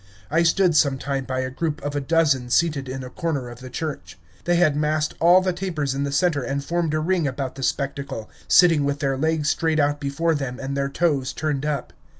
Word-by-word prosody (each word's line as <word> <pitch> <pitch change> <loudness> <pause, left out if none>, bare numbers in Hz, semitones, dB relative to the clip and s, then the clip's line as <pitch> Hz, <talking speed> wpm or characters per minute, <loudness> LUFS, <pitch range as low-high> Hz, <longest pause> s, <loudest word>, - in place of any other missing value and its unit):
I 165 +2 +3
stood 170 0 +3
some 140 -3 +3
time 135 0 -3
by 130 0 -2
a 130 0 -3
group 155 +3 -2
of 145 0 -3
a 145 - 0
dozen 145 -4 +2
seated 145 -2 +1
in 130 0 -5
a 125 - -7
corner 145 -7 -3
of 120 0 -11
the 130 0 -9
church. 155 +3 -5 0.3
They 175 - +2
had 170 -4 +3
massed 150 +1 0
all 175 +3 +6
the 185 -1 0
tapers 165 -7 -2
in 140 +1 -1
the 140 - -3
center 145 0 +1
and 140 +2 -3
formed 170 -2 0
a - - +1
ring 170 -1 +1
about 130 -1 -3
the 135 - -9
spectacle, 140 -4 -3 0.2
sitting 165 -5 +5
with 140 0 0
their 135 -2 0
legs 155 +1 0
straight 160 -1 +1
out 145 0 +1
before 145 +4 0
them 135 -4 -4
and 135 +1 -4
their 140 0 -1
toes 140 -4 0
turned 150 -2 -2
up. 145 -4 -3
145 Hz, 225 wpm, -23 LUFS, 135-165 Hz, 0.3 s, all